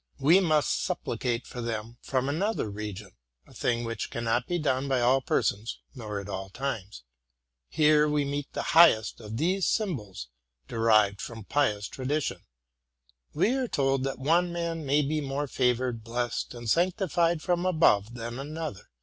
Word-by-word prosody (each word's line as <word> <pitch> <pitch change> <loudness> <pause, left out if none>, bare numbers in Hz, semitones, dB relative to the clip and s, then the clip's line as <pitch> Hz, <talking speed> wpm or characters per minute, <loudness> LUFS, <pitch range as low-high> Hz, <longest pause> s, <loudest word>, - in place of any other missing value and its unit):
We 155 +7 +6
must 155 -5 +2
supplicate 120 -1 -2
for 125 - -7
them 115 0 -5
from 130 -1 -1
another 185 - -1
region, 105 -1 -6 0.3
—a - - -18
thing 120 -1 0
which 115 -2 -4
cannot 120 +1 -1
be 175 - 0
done 140 -4 0
by 135 -2 +1
all 125 +3 +3
persons 110 -3 -1 0.2
nor 105 -6 -5
at 100 - -8
all 95 -1 -5
times. 105 - -5 0.7
Here 150 -1 +4
we 150 -1 +1
meet 145 0 -4
the - - -2
highest 160 -10 +6
of 110 +1 -6
these 185 +6 +1
sym 210 -6 +1
bols, 95 - -9 0.4
derived 110 -3 +3
from 115 -2 -7
pious 105 -5 0
tradition. 140 +3 -2 0.9
We 235 - +3
are 265 -2 0
told 135 - +1
that 135 - -3
one 170 +6 +2
man 165 -3 -3
may 145 +2 +3
be 155 +2 -1
more 140 +1 -2
favored, 125 -3 0
blessed, 120 +1 -3
and 120 -1 -8
sanctified 175 - +1
from 175 -1 +1
above 120 - +3
than 120 +1 -5
another. 150 -5 -6
130 Hz, 160 wpm, -28 LUFS, 115-155 Hz, 0.9 s, We